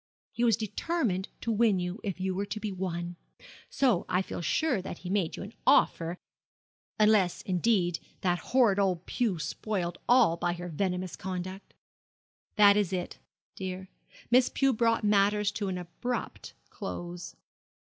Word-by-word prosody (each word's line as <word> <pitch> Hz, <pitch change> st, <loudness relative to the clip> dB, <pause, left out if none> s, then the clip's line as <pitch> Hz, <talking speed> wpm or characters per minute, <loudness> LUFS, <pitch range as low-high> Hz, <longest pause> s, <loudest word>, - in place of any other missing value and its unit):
He 235 Hz, -, -2 dB
was 230 Hz, -2 st, +4 dB
determined 220 Hz, -, -1 dB
to 230 Hz, -, -1 dB
win 215 Hz, -3 st, +3 dB
you 180 Hz, +4 st, -3 dB
if 195 Hz, -4 st, -3 dB
you 190 Hz, 0 st, -1 dB
were 200 Hz, +2 st, -2 dB
to 215 Hz, -, -4 dB
be 210 Hz, -1 st, -3 dB
won. 175 Hz, -2 st, -4 dB, 0.5 s
So 245 Hz, -10 st, +2 dB
I 180 Hz, +1 st, +2 dB
feel -, -, -6 dB
sure 265 Hz, -, +1 dB
that 180 Hz, -, -6 dB
he 180 Hz, -, -6 dB
made 195 Hz, -5 st, 0 dB
you -, -, -6 dB
an 205 Hz, +3 st, -9 dB
offer, 170 Hz, +1 st, +3 dB, 0.8 s
unless, 210 Hz, -4 st, +3 dB
indeed, 180 Hz, -2 st, +1 dB, 0.2 s
that 175 Hz, -1 st, +1 dB
horrid 230 Hz, -2 st, +3 dB
old 185 Hz, -3 st, +1 dB
Pew 225 Hz, -8 st, 0 dB
spoiled 175 Hz, +3 st, -3 dB
all 240 Hz, -9 st, +5 dB
by 175 Hz, +1 st, 0 dB
her 175 Hz, 0 st, -6 dB
venomous 180 Hz, +1 st, -2 dB
conduct.' 185 Hz, +1 st, -6 dB, 0.8 s
'That 205 Hz, -1 st, +7 dB
is 200 Hz, -3 st, +1 dB
it, 180 Hz, -2 st, -4 dB, 0.4 s
dear. 185 Hz, 0 st, -5 dB, 0.4 s
Miss 250 Hz, +1 st, +5 dB
Pew 270 Hz, -1 st, +2 dB
brought 230 Hz, 0 st, +2 dB
matters 205 Hz, 0 st, +3 dB
to 205 Hz, -1 st, -3 dB
an 185 Hz, -1 st, -2 dB
abrupt 180 Hz, +8 st, -5 dB, 0.2 s
close.' 175 Hz, 0 st, -6 dB
190 Hz, 155 wpm, -29 LUFS, 180-215 Hz, 0.8 s, That